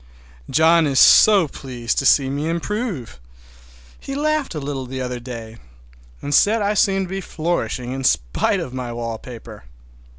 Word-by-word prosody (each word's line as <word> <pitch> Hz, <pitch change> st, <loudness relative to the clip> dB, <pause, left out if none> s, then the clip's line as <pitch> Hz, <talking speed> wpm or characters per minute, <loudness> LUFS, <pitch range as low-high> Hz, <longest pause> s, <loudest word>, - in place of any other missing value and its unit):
John 160 Hz, 0 st, +4 dB
is 135 Hz, -2 st, -1 dB
so 200 Hz, -6 st, +6 dB
pleased 125 Hz, -4 st, -4 dB
to 140 Hz, -, +1 dB
see 135 Hz, 0 st, +4 dB
me 145 Hz, +4 st, -3 dB
improve! 170 Hz, -, -4 dB, 0.8 s
He 275 Hz, -, -7 dB
laughed 305 Hz, -, -1 dB
a -, -, -3 dB
little 135 Hz, -2 st, -5 dB
the 130 Hz, +1 st, -6 dB
other 125 Hz, -1 st, -4 dB
day, 115 Hz, -2 st, -9 dB, 0.7 s
and 145 Hz, -, -3 dB
said 220 Hz, +8 st, +4 dB
I 205 Hz, 0 st, 0 dB
seemed 195 Hz, -2 st, +2 dB
to -, -, -11 dB
be 195 Hz, 0 st, -3 dB
flourishing 130 Hz, -, -3 dB
in 135 Hz, +1 st, -4 dB
spite -, -, +1 dB
of 125 Hz, -, -6 dB
my 125 Hz, -2 st, -5 dB
wallpaper. 115 Hz, -, -8 dB
140 Hz, 160 wpm, -20 LUFS, 125-190 Hz, 0.8 s, so